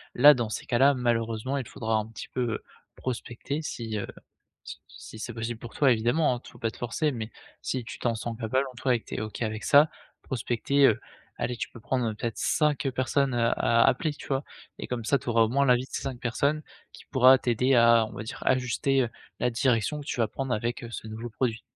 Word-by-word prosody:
là, 145 +4 +9
dans 120 -3 -2
ces - - -5
cas-là, 135 +4 +5
malheureusement, 120 +1 -1
il 130 - -4
faudra 110 -3 -2
un 110 - -1
petit 115 -2 -9
peu, 125 - -3
heu, - - -8 0.3
prospecter 130 +3 -4
si, 115 -7 -4
heu, 100 - -4 0.6
si - - -8
si 110 - -11
c'est 120 - -5
possible 115 0 -4
pour 120 - -9
toi, 140 -3 +4
évidemment, 120 +6 +2
hein. - - -5
T - - -14
faut - - -15
pas 115 - -1
te - - -15
forcer, 135 +6 -1
mais 115 -3 -5 0.3
si 130 -2 -2
tu - - -8
t'en 120 -2 0
sens 115 +1 -4
capable, 130 +4 0
en - - -23
toi 125 0 +1
et 120 - 0
que - - -30
tu - - -6
es - - -4
OK 110 +2 -5
avec 110 -1 -3
ça, 150 +1 +6 0.3
prospecter, 130 +3 +1
heu, 110 +1 +1 0.4
allez, 120 0 -2
tu - - -4
peux 115 - -12
prendre 120 -1 -1
peut-être 115 +1 -4
5 150 -3 +1
personnes, 130 +1 0
heu, 115 -1 +2
à 115 0 +3
appeler, 155 - +2
tu - - -11
vois 135 0 0 0.3
et - - -5
comme 120 -2 -3
ça, 140 +5 +3
tu 125 - -10
auras 115 -1 +4
au 110 - +3
moins 140 +4 +2
l'avis 125 0 +4
de - - -23
ces - - -3
5 135 -3 -4
personnes, 140 +6 0 0.3
qui - - -14
pourra 130 0 +6
t'aider 125 +2 +2
à, 115 -1 +6
on - - -11
va - - -5
dire, 110 - -7
ajuster, 130 +2 +2
heu, 120 - -2 0.3
la 125 - +2
direction 125 +4 +1
que 145 - -10
tu 125 - -3
vas 115 - +2
prendre 135 -2 -4
avec, 120 +4 -3
heu, 115 - -8
ce 120 - -7
nouveau 115 +2 -6
produit. 115 0 -1
120 Hz, 245 wpm, -27 LUFS, 115-135 Hz, 0.6 s, là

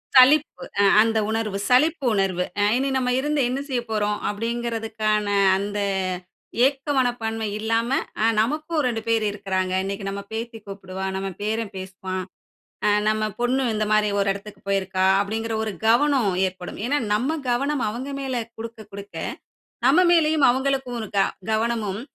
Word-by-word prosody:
சலிப்பு, 280 +4 +6 0.2
அ - - +5 0.2
அந்த 225 0 +2
உணர்வு, 220 -3 -1
சலிப்பு 295 +4 +3
உணர்வு, 190 -3 +1 0.2
அ - - +4
"இனி 270 +1 0
நம்ம 250 -1 0
இருந்து 295 +1 0
என்ன 260 +2 -2
செய்ய 255 -4 -1
போறோம்?" 210 -1 0
அப்டிங்கறதுக்கான 225 -1 -1 0.3
அந்த 205 +1 -3 0.9
ஏக்க 275 +1 -1
மனப்பான்மை 225 -3 0
இல்லாம, 225 +2 0 0.3
அ - - +4 0.2
"நமக்கும் 305 +6 -1
ரெண்டு 225 -2 -2
பேரு 225 -1 +2
இருக்குறாங்க. 190 -2 -2
இன்னைக்கு 195 +1 -4
நம்ம 200 0 -4
பேத்தி 225 +1 -5
கூப்புடுவா, 190 -1 -6
நம்ம 195 0 -3
பேரன் 220 0 -2
பேசுவான். 185 0 -5 0.6
அ - - +5 0.2
நம்ம 215 0 0 0.2
பொண்ணு 255 +2 +1
இந்த 215 0 0
மாரி 215 -1 +3
ஒரு 200 - +1
இடத்துக்கு 200 +1 -11
போயிருக்கா" 190 -1 +1 0.2
அப்டிங்குற 225 +2 -2
ஒரு 215 -2 -3
கவனம் 245 -2 +4 0.2
ஏற்படும். 180 -1 -8
ஏனா, 290 +2 +1
நம்ம 270 +9 0
கவனம் 275 +3 0
அவங்க 250 +6 -5
மேல 255 -3 -2
குடுக்க 225 0 -7
குடுக்க, 200 0 -10 0.7
நம்ம 300 +7 +5
மேலேயும் 315 -4 +4
அவங்களுக்கும் 265 -1 -1
ஒரு 215 - -6
க - - +5 0.3
கவனமும் 220 -2 -1
225 Hz, 150 wpm, -23 LUFS, 205-255 Hz, 0.9 s, சலிப்பு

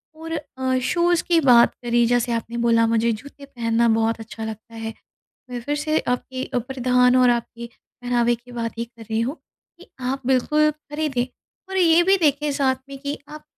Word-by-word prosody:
और 325 +1 -8 0.3
अ, 260 0 0
शूज़ 345 +3 +2
की 340 -1 +4
बात 245 -4 +6
करी, 240 0 +2
जैसे 240 +1 +1
आपने 230 +1 -3
बोला 230 -1 +3
मुझे 230 0 +2
जूते 280 +5 -8
पहनना 235 -3 0
बहुत 225 0 +1
अच्छा 225 0 -7
लगता 220 +1 -8
है, 225 0 -5 0.6
मैं 245 -1 -4
फिर 290 +3 -2
से 310 +1 0
आपके 255 +1 -2
अ, - - -2
प्रधान 250 0 +2
और 250 -1 +5
आपके 235 0 -3 0.4
पहनावे 240 -1 +2
की 240 +1 -14
बात 230 -1 -4
ही 230 - -1
कर 235 -1 -16
रही 220 - +1
हूँ, 260 +8 -2 0.4
कि 360 - -15
आप 255 +1 -3
बिल्कुल 300 +4 +3
खरीदें 295 -4 -3 0.4
और 380 - -3
ये 345 -2 +5
भी 385 +2 +5
देखें 295 -3 +2
साथ 270 -2 +1
में 275 0 -8
कि 285 +1 -4
आप 305 0 -10
250 Hz, 190 wpm, -22 LUFS, 235-290 Hz, 0.6 s, बात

